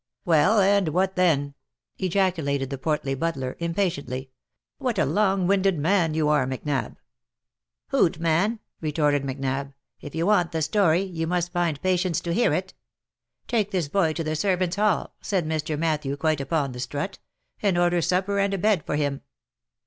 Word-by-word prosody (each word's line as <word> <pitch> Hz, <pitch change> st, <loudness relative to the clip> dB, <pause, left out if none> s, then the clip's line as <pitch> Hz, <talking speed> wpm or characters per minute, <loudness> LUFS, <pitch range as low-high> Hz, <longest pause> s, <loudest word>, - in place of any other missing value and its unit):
" -, -, -53 dB
Well! 175 Hz, +6 st, +4 dB
and 200 Hz, -1 st, +3 dB
what 185 Hz, +4 st, 0 dB
then?'* 145 Hz, -6 st, +2 dB, 0.5 s
ejaculated 165 Hz, -8 st, 0 dB
the 135 Hz, -, -4 dB
portly 145 Hz, -1 st, -1 dB
butler, 135 Hz, -3 st, -2 dB
impa 170 Hz, +4 st, +1 dB
tiently. 135 Hz, -6 st, -4 dB, 0.2 s
" -, -, -61 dB
What 250 Hz, -6 st, -1 dB
a -, -, +3 dB
long 195 Hz, -3 st, +1 dB
winded 195 Hz, -1 st, +2 dB
man 165 Hz, 0 st, +2 dB
you 155 Hz, -1 st, +1 dB
are, 150 Hz, -4 st, +2 dB
Macnab." 135 Hz, +2 st, -3 dB, 0.5 s
" -, -, -65 dB
Hoot, 185 Hz, -, +2 dB
man 170 Hz, +7 st, +1 dB
!" -, -, -48 dB
retorted 150 Hz, -2 st, +1 dB
Macnab, 135 Hz, 0 st, -3 dB
" -, -, -45 dB
if 145 Hz, -, -9 dB
you 165 Hz, +1 st, 0 dB
want 180 Hz, -5 st, +2 dB
the 160 Hz, -1 st, 0 dB
story, 180 Hz, -1 st, +3 dB
you 165 Hz, -4 st, -4 dB
must 175 Hz, 0 st, 0 dB
just -, -, -37 dB
find 170 Hz, -5 st, 0 dB
patience 185 Hz, -2 st, +1 dB
to 170 Hz, -, -2 dB
hear 240 Hz, +7 st, +3 dB
it. -, -, -2 dB, 0.7 s
'Take 215 Hz, -4 st, +1 dB
this 180 Hz, -7 st, -1 dB
boy 165 Hz, -2 st, +2 dB
to 165 Hz, -, -3 dB
the 155 Hz, 0 st, -2 dB
servants' 185 Hz, +1 st, 0 dB
hall,' 210 Hz, -3 st, +1 dB
said 190 Hz, -5 st, -1 dB, 0.2 s
Sir 155 Hz, -, -2 dB
Matthew, 150 Hz, -3 st, -1 dB
quite 155 Hz, -1 st, 0 dB
upon 140 Hz, 0 st, -1 dB
the 125 Hz, -, -8 dB
strut, 145 Hz, +9 st, -4 dB, 0.2 s
' -, -, -40 dB
and 195 Hz, -4 st, +2 dB
order 175 Hz, 0 st, +2 dB
supper 190 Hz, +4 st, 0 dB
and 200 Hz, 0 st, +1 dB
a -, -, -2 dB
bed 205 Hz, -4 st, +2 dB
for -, -, -2 dB
him.' 145 Hz, -2 st, -1 dB
165 Hz, 190 wpm, -25 LUFS, 145-190 Hz, 0.7 s, Well